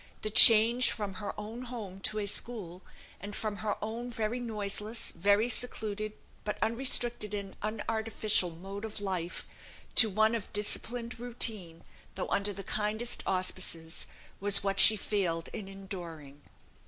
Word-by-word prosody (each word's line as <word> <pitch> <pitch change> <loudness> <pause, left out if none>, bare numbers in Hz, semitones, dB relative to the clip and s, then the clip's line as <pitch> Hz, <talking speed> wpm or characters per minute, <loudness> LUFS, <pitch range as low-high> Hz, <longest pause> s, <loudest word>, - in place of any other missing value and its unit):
The 215 - -2
change 230 +3 +8
from 205 -3 -3
her 205 - -3
own 225 +4 -7
home 215 -6 -7
to 215 +2 -2
a 210 - -1
school, 195 -4 -1 0.4
and 200 +3 -7
from 215 -2 -3
her 215 -1 -2
own 230 +3 -4
very 230 0 -2
noiseless, 215 -1 -3
very 205 +6 +2
secluded, 215 -4 -2 0.3
but 210 - -3
unrestricted 235 -3 0
and 200 -1 -6
unartificial 215 -2 0
mode 195 +5 -8
of 220 -1 -6
life, 185 -4 -3 0.5
to 225 - +7
one 220 +3 +3
of 230 -4 -4
disciplined 230 +3 -2
routine 220 -8 -1 0.3
(though - - -4
under 200 +1 0
the 195 0 -7
kindest 215 +4 -1
auspices), 185 -3 -1 0.3
was 200 0 +3
what 195 0 -1
she 220 - +9
failed 185 -5 -2
in 200 - -5
enduring. 170 -7 -9
210 Hz, 140 wpm, -30 LUFS, 195-225 Hz, 0.5 s, she